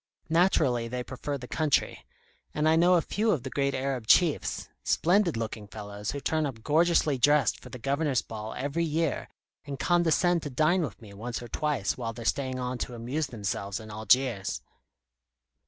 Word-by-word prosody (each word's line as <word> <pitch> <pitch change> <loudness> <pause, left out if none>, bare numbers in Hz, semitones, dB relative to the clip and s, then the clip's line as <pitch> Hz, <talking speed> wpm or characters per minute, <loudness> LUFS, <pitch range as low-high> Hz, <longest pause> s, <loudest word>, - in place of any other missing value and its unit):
Naturally 155 -8 +3
they 125 +1 -4
prefer 140 +3 -4
the 125 -2 -9
country. 155 0 0 0.5
And 150 +1 +2
I 160 - +5
know 175 +2 +5
a 170 - +3
few 220 +2 0
of 155 - +1
the 130 - -6
great 140 -1 0
Arab 130 -3 -2
Chiefs 165 +1 +3 0.2
splendid 175 - +2
looking 110 -2 -4
fellows 105 0 -7
who 140 - -2
turn 155 +1 0
up 115 -5 -8
gorgeously 155 -3 +3
dressed 145 -1 +3
for - - -12
the - - -8
Governor's 140 +1 0
ball 110 0 -7
every 145 +5 -1
year, 160 -2 -1 0.3
and 140 -2 -6
condescend 175 +2 +3
to 145 - -5
dine 155 +7 +2
with 140 -11 -4
me 100 -2 -12
once 115 +4 -5
or - - -8
twice 135 -4 -1
while 115 -2 -3
they're 115 0 -8
staying 130 +1 0
on 125 0 -3
to 120 - -4
amuse 130 +6 -2
themselves 100 -4 -3
in 110 -1 -10
Algiers." 110 0 +1
135 Hz, 180 wpm, -28 LUFS, 115-155 Hz, 0.5 s, I